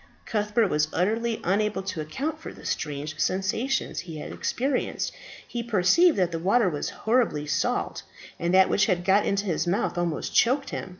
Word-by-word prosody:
Cuthbert 210 Hz, 0 st, +1 dB
was 150 Hz, -1 st, +2 dB
utterly 225 Hz, +5 st, 0 dB
unable 205 Hz, +1 st, 0 dB
to 190 Hz, -4 st, -4 dB
account 285 Hz, -, -4 dB
for -, -, -8 dB
the -, -, -14 dB
strange 150 Hz, +2 st, -3 dB
sensations 195 Hz, +8 st, 0 dB
he 165 Hz, -3 st, -7 dB
had 150 Hz, -, -7 dB
experienced; 260 Hz, +1 st, -2 dB, 0.3 s
he 240 Hz, -, -4 dB
perceived 235 Hz, -, +4 dB
that 180 Hz, -2 st, +2 dB
the 165 Hz, -, -3 dB
water 200 Hz, +5 st, +3 dB
was 150 Hz, -3 st, -3 dB
horribly 220 Hz, -10 st, 0 dB
salt, 150 Hz, -, -1 dB, 0.4 s
and 170 Hz, +1 st, 0 dB
that 190 Hz, 0 st, +6 dB
which 200 Hz, -, +2 dB
had 175 Hz, -3 st, 0 dB
got 195 Hz, +2 st, +4 dB
into 200 Hz, +1 st, 0 dB
his 175 Hz, -2 st, -1 dB
mouth 175 Hz, -1 st, 0 dB
almost 170 Hz, -3 st, -2 dB
choked 265 Hz, +4 st, +3 dB
him. -, -, -5 dB
195 Hz, 175 wpm, -26 LUFS, 175-235 Hz, 0.4 s, that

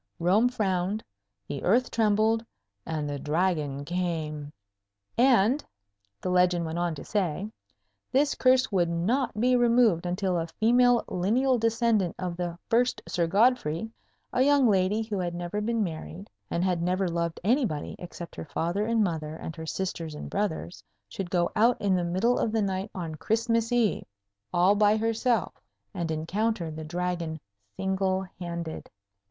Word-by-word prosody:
Rome 190 Hz, +8 st, +3 dB
frowned, 200 Hz, -3 st, -1 dB, 0.4 s
the 140 Hz, -, -4 dB
earth 240 Hz, +7 st, +2 dB
trembled, 220 Hz, 0 st, +2 dB, 0.4 s
and 155 Hz, -2 st, -2 dB
the 145 Hz, -1 st, -4 dB
Dragon 150 Hz, -3 st, -1 dB
came. 160 Hz, -4 st, -3 dB, 0.6 s
And 245 Hz, +2 st, +4 dB, 0.6 s
(the 185 Hz, -, -2 dB
legend 180 Hz, -1 st, +3 dB
went 160 Hz, +1 st, -3 dB
on 175 Hz, -2 st, 0 dB
to 140 Hz, -, -8 dB
say) 200 Hz, 0 st, -1 dB, 0.6 s
this 280 Hz, +2 st, +3 dB
curse 255 Hz, -1 st, +3 dB
would 175 Hz, -4 st, +2 dB
not 215 Hz, +8 st, 0 dB
be 250 Hz, +2 st, +3 dB
removed 235 Hz, -8 st, +3 dB
until 180 Hz, 0 st, 0 dB
a 165 Hz, -, -2 dB
female 245 Hz, +2 st, +4 dB
lineal 240 Hz, +8 st, +1 dB
descendant 230 Hz, -5 st, +1 dB
of 180 Hz, -2 st, -3 dB
the 175 Hz, -1 st, -4 dB
first 245 Hz, +2 st, +1 dB
Sir 170 Hz, -1 st, 0 dB
Godfrey, 210 Hz, -2 st, +2 dB, 0.4 s
a 250 Hz, -, +2 dB
young 280 Hz, -1 st, +5 dB
lady 200 Hz, +1 st, +2 dB
who 215 Hz, -3 st, -3 dB
had 175 Hz, -1 st, -2 dB
never 175 Hz, +4 st, -3 dB
been 225 Hz, 0 st, 0 dB
married, 170 Hz, +2 st, -6 dB, 0.2 s
and 170 Hz, -, -1 dB
had 180 Hz, -2 st, +1 dB
never 185 Hz, +2 st, +1 dB
loved 170 Hz, -1 st, -2 dB
anybody 220 Hz, -, 0 dB
except 175 Hz, -1 st, -8 dB
her -, -, -5 dB
father 175 Hz, +7 st, -1 dB
and 230 Hz, -1 st, +2 dB
mother 160 Hz, -4 st, -2 dB
and 160 Hz, 0 st, -7 dB
her 160 Hz, 0 st, -7 dB
sisters 165 Hz, -4 st, -3 dB
and -, -, -7 dB
brothers, 160 Hz, -, -3 dB, 0.3 s
should 175 Hz, -, -5 dB
go 175 Hz, -1 st, +1 dB
out 235 Hz, +3 st, +4 dB
in 200 Hz, -2 st, +1 dB
the 180 Hz, -, 0 dB
middle 190 Hz, +8 st, +1 dB
of 220 Hz, -, 0 dB
the 220 Hz, -1 st, +1 dB
night 195 Hz, +1 st, -2 dB
on 170 Hz, -4 st, -4 dB
Christmas 230 Hz, +6 st, 0 dB
Eve, 240 Hz, -4 st, +1 dB, 0.5 s
all 180 Hz, +3 st, +4 dB
by 210 Hz, +1 st, +4 dB
herself, 225 Hz, -1 st, 0 dB, 0.4 s
and 170 Hz, -2 st, -3 dB
encounter 170 Hz, +3 st, -1 dB
the 155 Hz, +1 st, -7 dB
Dragon 170 Hz, -1 st, -3 dB, 0.4 s
single 190 Hz, 0 st, 0 dB, 0.2 s
handed. 170 Hz, -2 st, -5 dB
190 Hz, 155 wpm, -27 LUFS, 170-225 Hz, 0.6 s, young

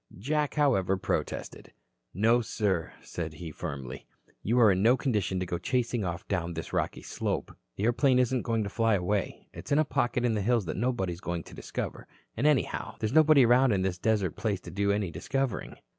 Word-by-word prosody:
Jack, 150 Hz, +8 st, -1 dB
however, 110 Hz, -11 st, +2 dB
protested. 95 Hz, -, -4 dB, 0.4 s
"No, 115 Hz, +6 st, +3 dB
sir," 100 Hz, -6 st, -1 dB
said 80 Hz, -2 st, -5 dB
he 80 Hz, +1 st, -7 dB
firmly, 70 Hz, -5 st, -6 dB, 0.3 s
"you 120 Hz, +4 st, +1 dB
are 110 Hz, -4 st, +7 dB
in 95 Hz, 0 st, +1 dB
no 120 Hz, +5 st, +5 dB
condition 105 Hz, -8 st, 0 dB
to 90 Hz, -, -2 dB
go 85 Hz, -1 st, -3 dB
chasing 125 Hz, -3 st, 0 dB
off 85 Hz, -1 st, -4 dB
down 85 Hz, -3 st, -2 dB
this 80 Hz, -, -6 dB
rocky -, -, -1 dB
slope. -, -, -3 dB, 0.2 s
The 100 Hz, -, -4 dB
airplane 125 Hz, +3 st, +3 dB
isn't 125 Hz, 0 st, +2 dB
going 115 Hz, -2 st, 0 dB
to 100 Hz, -, -4 dB
fly 115 Hz, 0 st, +2 dB
away. 95 Hz, +1 st, -2 dB
It's -, -, -9 dB
in 140 Hz, -, +4 dB
a 155 Hz, -, +4 dB
pocket 125 Hz, -2 st, 0 dB
in 120 Hz, -, +2 dB
the 105 Hz, -, 0 dB
hills 115 Hz, 0 st, +1 dB
that 85 Hz, -, -3 dB
nobody 110 Hz, -6 st, -1 dB
is 85 Hz, -, -11 dB
going 85 Hz, -1 st, -3 dB
to -, -, -14 dB
discover. -, -, -5 dB, 0.3 s
And, 130 Hz, +7 st, +1 dB
anyhow, 150 Hz, -5 st, 0 dB
there -, -, -1 dB
is 110 Hz, -, -2 dB
nobody 155 Hz, -4 st, +6 dB
around 125 Hz, 0 st, +5 dB
in 95 Hz, -2 st, +1 dB
this 90 Hz, -1 st, -2 dB
desert 105 Hz, -6 st, +1 dB
place 105 Hz, -4 st, -1 dB
to -, -, -9 dB
do 100 Hz, +1 st, +1 dB
any 100 Hz, -4 st, -1 dB
discovering. 135 Hz, +6 st, -2 dB
105 Hz, 205 wpm, -29 LUFS, 95-125 Hz, 0.4 s, are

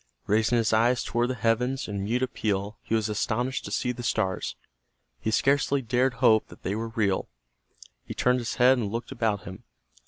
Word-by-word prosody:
Raising 110 Hz, +3 st, +2 dB
his 115 Hz, -1 st, +1 dB
eyes 120 Hz, +3 st, +3 dB
toward 120 Hz, +1 st, 0 dB
the 130 Hz, -, -1 dB
heavens 125 Hz, +3 st, 0 dB
in 100 Hz, -1 st, -3 dB
mute 120 Hz, +5 st, 0 dB
appeal 105 Hz, -4 st, -2 dB
he 115 Hz, -, -1 dB
was 110 Hz, -2 st, +1 dB
astonished 115 Hz, +4 st, -1 dB
to -, -, -6 dB
see 125 Hz, -, 0 dB
the 125 Hz, 0 st, -7 dB
stars. 110 Hz, -5 st, -1 dB, 0.6 s
He -, -, -2 dB
scarcely 140 Hz, +3 st, +2 dB
dared 125 Hz, +2 st, +1 dB
hope 115 Hz, -3 st, +4 dB
that -, -, -15 dB
they 95 Hz, -, -1 dB
were 115 Hz, +2 st, -3 dB
real. 105 Hz, -4 st, 0 dB, 0.7 s
He -, -, -8 dB
turned 125 Hz, 0 st, +2 dB
his 120 Hz, 0 st, -3 dB
head 130 Hz, +1 st, +5 dB
and 105 Hz, -4 st, -2 dB
looked 115 Hz, +4 st, -4 dB
about 110 Hz, -6 st, -1 dB
him. 95 Hz, +5 st, -9 dB
115 Hz, 190 wpm, -27 LUFS, 110-125 Hz, 0.7 s, head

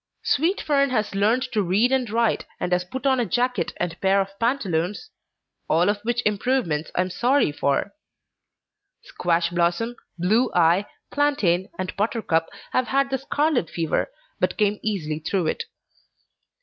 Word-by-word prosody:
Sweet 335 Hz, +8 st, +1 dB
Fern 280 Hz, -2 st, +2 dB
has 215 Hz, -5 st, -1 dB
learned 215 Hz, +6 st, +2 dB
to 215 Hz, -, +1 dB
read 200 Hz, +7 st, +2 dB
and 260 Hz, -3 st, +1 dB
write, 230 Hz, +1 st, +1 dB
and 180 Hz, -, -2 dB
has 180 Hz, 0 st, +2 dB
put 260 Hz, +10 st, -7 dB
on 265 Hz, -2 st, +3 dB
a 240 Hz, -, +1 dB
jacket 245 Hz, -2 st, 0 dB
and 175 Hz, 0 st, -3 dB
pair 195 Hz, +1 st, +3 dB
of 195 Hz, 0 st, -3 dB
pantaloons 210 Hz, -, -1 dB, 0.6 s
all 170 Hz, +4 st, +3 dB
of 205 Hz, 0 st, -1 dB
which 240 Hz, +2 st, -1 dB
improvements 210 Hz, -, 0 dB
I -, -, +3 dB
am 185 Hz, 0 st, -2 dB
sorry 250 Hz, -, +2 dB
for. 140 Hz, +6 st, 0 dB, 1.1 s
Squash 170 Hz, -1 st, 0 dB
Blossom, 175 Hz, +8 st, 0 dB, 0.2 s
Blue 215 Hz, +9 st, +2 dB
Eye, 175 Hz, +3 st, +4 dB, 0.2 s
Plantain, 210 Hz, -12 st, +1 dB
and 185 Hz, 0 st, -4 dB
Buttercup 200 Hz, -6 st, 0 dB, 0.2 s
have 255 Hz, -, +1 dB
had 275 Hz, 0 st, +1 dB
the 265 Hz, -, 0 dB
scarlet 280 Hz, -, 0 dB
fever, 165 Hz, -2 st, -1 dB, 0.3 s
but -, -, 0 dB
came 210 Hz, -1 st, +1 dB
easily 155 Hz, -8 st, -2 dB
through 180 Hz, +2 st, -1 dB
it. 155 Hz, -, -2 dB
205 Hz, 155 wpm, -24 LUFS, 175-250 Hz, 1.1 s, Eye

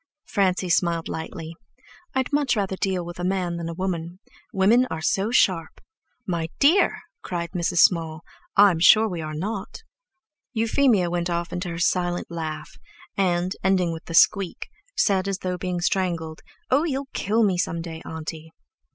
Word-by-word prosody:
Francie 190 Hz, -2 st, +1 dB
smiled 170 Hz, -1 st, +1 dB
lightly. 160 Hz, 0 st, -6 dB, 0.6 s
"I'd 260 Hz, +2 st, -1 dB
much 285 Hz, -4 st, +2 dB
rather 195 Hz, -2 st, -1 dB
deal 185 Hz, -2 st, -1 dB
with 175 Hz, 0 st, -8 dB
a -, -, -3 dB
man 180 Hz, -2 st, -1 dB
than 170 Hz, -1 st, -4 dB
a -, -, -4 dB
woman. 175 Hz, -2 st, -3 dB, 0.3 s
Women 225 Hz, +7 st, +4 dB
are -, -, -4 dB
so 195 Hz, +6 st, 0 dB
sharp!" 185 Hz, -9 st, +1 dB, 0.5 s
"My 170 Hz, -4 st, -2 dB
dear," 320 Hz, +8 st, +3 dB, 0.2 s
cried 170 Hz, -1 st, -4 dB
Mrs. 175 Hz, -1 st, +1 dB
Small, 160 Hz, -3 st, +3 dB, 0.3 s
"I'm 195 Hz, -5 st, +6 dB
sure 215 Hz, +6 st, +6 dB
we're 165 Hz, -6 st, -4 dB
not." 200 Hz, -, -5 dB, 0.7 s
Euphemia 225 Hz, -5 st, +2 dB
went 175 Hz, 0 st, -1 dB
off 170 Hz, 0 st, -2 dB
into 180 Hz, 0 st, -3 dB
her 165 Hz, -, -5 dB
silent 175 Hz, 0 st, 0 dB
laugh, 160 Hz, -2 st, -6 dB, 0.4 s
and, 180 Hz, -1 st, 0 dB
ending 185 Hz, -3 st, +2 dB
with 160 Hz, -, -9 dB
the 165 Hz, -, -5 dB
squeak, 195 Hz, 0 st, +3 dB, 0.3 s
said, 195 Hz, -2 st, +2 dB
as 195 Hz, -1 st, -1 dB
though 180 Hz, -1 st, -4 dB
being 180 Hz, -1 st, -3 dB
strangled: 170 Hz, -4 st, -1 dB, 0.3 s
"Oh, 275 Hz, +4 st, +4 dB
you'll 275 Hz, -4 st, -2 dB
kill 220 Hz, +3 st, +1 dB
me 190 Hz, -4 st, +2 dB
some 170 Hz, -1 st, -1 dB
day, 165 Hz, -1 st, -7 dB
auntie." 160 Hz, 0 st, -7 dB
180 Hz, 160 wpm, -24 LUFS, 170-195 Hz, 0.7 s, I'm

